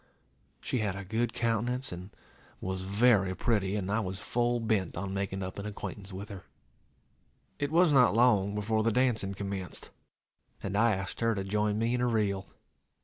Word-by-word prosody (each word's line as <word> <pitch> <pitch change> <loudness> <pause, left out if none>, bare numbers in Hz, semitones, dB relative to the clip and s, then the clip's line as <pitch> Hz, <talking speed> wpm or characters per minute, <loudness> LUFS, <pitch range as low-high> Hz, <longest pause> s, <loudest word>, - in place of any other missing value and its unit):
She 125 - -1
had 105 -3 -1
a 100 0 -6
good 115 +4 0
countenance, 120 +2 -1
and 90 +2 -7 0.5
was 95 0 -3
very 100 -1 +3
pretty, 100 -4 +1
and 100 -2 -2
I 105 - +2
was 95 -3 -3
full 120 +3 0
bent 110 -7 0
on 95 +1 -3
making 95 0 -2
up 95 +2 -6
an 100 - -4
acquaintance 100 -1 -6
with 95 +2 -7
her. 100 -3 -7 1.2
It 145 - 0
was 170 -1 +5
not 125 -5 +5
long 105 -4 +4
before 110 +1 +1
the 115 +1 +2
dancing 110 -5 +1
commenced, 100 -2 -5 0.7
and 100 0 -3
I 110 0 +4
asked 95 0 -5
her 115 -1 +2
to 95 - -2
join 105 +1 0
me 115 +2 +1
in 125 - 0
a 125 - +2
reel. 100 -4 0
105 Hz, 180 wpm, -30 LUFS, 95-115 Hz, 1.2 s, was